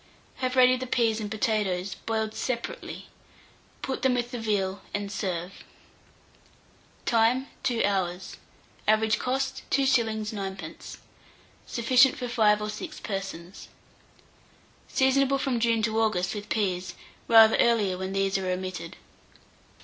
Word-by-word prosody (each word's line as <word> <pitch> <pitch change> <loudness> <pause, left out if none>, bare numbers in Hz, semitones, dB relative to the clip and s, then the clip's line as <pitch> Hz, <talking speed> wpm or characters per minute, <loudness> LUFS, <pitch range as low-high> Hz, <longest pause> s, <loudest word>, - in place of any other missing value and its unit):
Have 255 0 -2
ready 255 0 +6
the 255 0 -5
peas 230 -3 +1
and 210 -2 -4
potatoes, 205 -4 -1
boiled 220 -1 -3
separately; 255 - -4 0.8
put 265 - -3
them 260 -2 +3
with 240 0 -2
the 245 - -4
veal, 200 -3 -1
and 205 -1 -3
serve. 180 -2 -4 1.4
Time. 235 +3 +3 0.2
2 245 -4 0
hours. 190 -2 -2 0.5
Average 215 0 +3
cost, 265 +1 -2
2s. 235 -6 +2
9d. 195 -2 -7 0.7
Sufficient 255 +2 +4
for 250 - -4
5 215 -3 +3
or 210 - -3
6 310 +9 -7
persons. 195 -3 -6 1.2
Seasonable 275 +1 +2
from 265 -3 -1
June 230 -1 +2
to 220 0 +1
August 200 -5 0
with 210 0 -7
peas; 185 -4 -1 0.3
rather 225 -1 +7
earlier 215 -6 +3
when 190 +1 -4
these 195 0 +1
are 185 -1 -3
omitted. 185 -2 -4
220 Hz, 125 wpm, -27 LUFS, 195-250 Hz, 1.4 s, rather